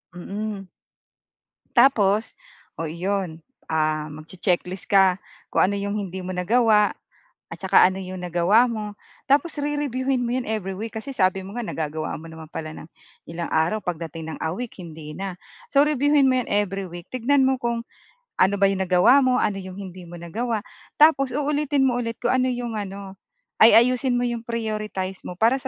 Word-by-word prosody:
Mm. 200 +1 -5 1.0
Tapos, 220 -4 +4 0.4
oh 165 - -2
iyon, 180 0 -2 0.3
ah, 155 -1 0
mag-che-checklist 175 +4 -3
ka 190 -2 +5 0.3
kung - - +3
ano 200 - -2
'yong 200 +1 -2
hindi 190 +2 -7
mo 185 - -4
nagawa 210 +3 +3 0.6
at - - -8
saka - - +6
ano 190 +1 +1
'yong 185 -1 -7
nagawa 180 +6 +3
mo. 215 -2 -4 0.4
Tapos 295 +4 +2
rereviewhin 275 -3 -1
mo 240 0 -1
'yon 255 - -3
every 210 -3 -3
week 220 +2 -5
kasi 220 +5 -6
sabi 190 -4 +2
mo 200 +5 -8
nga 240 - -3
nagagawa 155 -4 -3
mo 165 +1 -11
naman 160 -1 -11
pala 155 -2 -6
ng - - -10 0.4
ilang 170 +1 -4
araw 170 +7 +1
pagdating 165 -2 -5
ng - - -19
a 160 - 0
week 245 +3 -6
hindi 155 -2 -9
na. 190 -2 -5 0.4
So, 280 - +6
reviewhin 290 -1 +3
mo 255 - +3
'yon - - -8
every 195 -1 0
week, 175 0 -10
tignan 260 +3 +2
mo 265 0 +2
kung 235 -1 -1 0.6
ano 195 +2 +4
ba 200 - +4
'yong 195 -1 -1
nagawa 185 +9 +5
mo, 255 -1 +3
ano 200 - 0
'yong 185 -1 -8
hindi 185 -2 -8
mo 175 +1 -10
nagawa 215 +6 -3 0.4
tapos 295 -3 +5
uulitin 290 -1 +1
mo 245 -2 +2
ulit 230 -1 -3
kung - - +2
ano 255 0 +2
'yong 240 -2 -3
ano 195 -1 -7 0.4
ay 220 - +8
ayusin 250 +2 +4
mo 245 - +1
'yong 240 -1 -2
prioritize 215 -5 -3
mo 180 - -6
para 230 +7 +3
sa 265 - -6
205 Hz, 180 wpm, -23 LUFS, 180-245 Hz, 1.0 s, ay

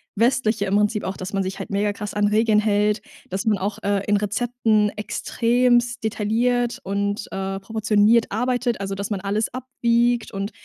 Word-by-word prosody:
Westliche 225 -2 +2
im 195 0 0
Prinzip 210 +1 +1
auch, 190 - -4
dass 185 +2 -6
man 195 -1 +1
sich 190 +1 -5
halt - - -6
megakrass 205 +1 -2
an 205 0 +2
Regeln 215 0 +3
hält, 210 0 +1 0.3
dass 190 +4 -3
man 215 -2 +2
auch, 200 +2 -3
äh, 200 -1 +1
in 205 0 +3
Rezepten 215 0 +1
extrem 240 +3 +1
detailliert 235 +3 0
und, 200 +1 -2
äh, 195 0 -3
proportioniert 220 +2 +2
arbeitet, 245 +1 0
also 195 0 -3
dass 200 +1 -4
man 205 -3 -2
alles 205 +4 -1
abwiegt 240 -2 0
und 200 0 -4
210 Hz, 170 wpm, -22 LUFS, 200-235 Hz, 0.3 s, Regeln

